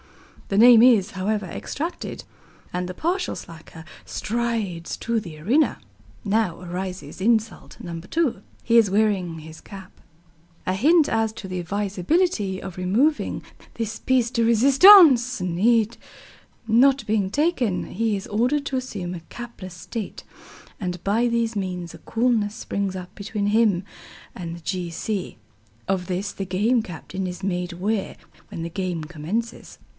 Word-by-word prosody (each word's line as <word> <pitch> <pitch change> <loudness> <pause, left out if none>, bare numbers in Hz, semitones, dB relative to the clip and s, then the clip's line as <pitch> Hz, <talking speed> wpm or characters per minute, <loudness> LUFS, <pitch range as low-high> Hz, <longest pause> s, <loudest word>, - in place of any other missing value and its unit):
The 195 - -1
name 235 +1 +8
is, 225 -5 +5
however, 205 +1 -2
extracted, 315 - -5 0.5
and 180 0 -2
the 180 - -6
partial 360 - -1
slacker 160 0 -11 0.2
strides 220 -7 -3
to 230 0 -1
the 170 -7 -10
arena. 255 - +2 0.5
Now 205 -4 0
arises 180 +1 -6
insult 220 -2 0
No. 170 -1 -6
2. 255 - -1 0.2
He 235 0 +4
is 225 -4 +5
wearing 195 -5 +1
his 160 +1 -11
cap. 195 -2 -11 0.7
A 185 - 0
hint 305 - +4
as 225 -1 +1
to 210 -3 -8
the 185 -1 -4
advisability 200 - 0
of 190 -2 -7
removing 230 +13 +1 0.3
this 225 -1 -4
pièce 250 -2 +2
de 230 - +2
résistance 265 - +7 1.3
not 265 +5 +4
being 210 -3 +1
taken, 255 - 0
he 220 0 0
is 195 - -8
ordered 250 +7 +1
to 275 - -3
assume 200 -9 -4
a 175 - -7
capless 235 -7 -9
state, 215 +3 -6 0.6
and 180 -2 -3
by 225 +5 +2
these 235 -1 0
means 180 -3 -4
a - - -10
coolness 225 -3 0
springs 200 -5 -3
up 180 -1 -8
between 205 0 -3
him 210 -4 +3 0.5
and 170 -2 -6
the - - -13
G. 180 0 -3
C. 190 +3 -4 0.5
Of 185 -2 -1
this 185 +1 -3
the 195 - -4
Game 210 +7 +2
Captain 185 0 -6
is 180 +1 -6
made 180 -1 -2
aware 195 +3 -2 0.3
when 165 - -6
the 170 - -4
game 180 -2 -3
commences. 175 +9 -5
205 Hz, 145 wpm, -23 LUFS, 180-235 Hz, 1.3 s, name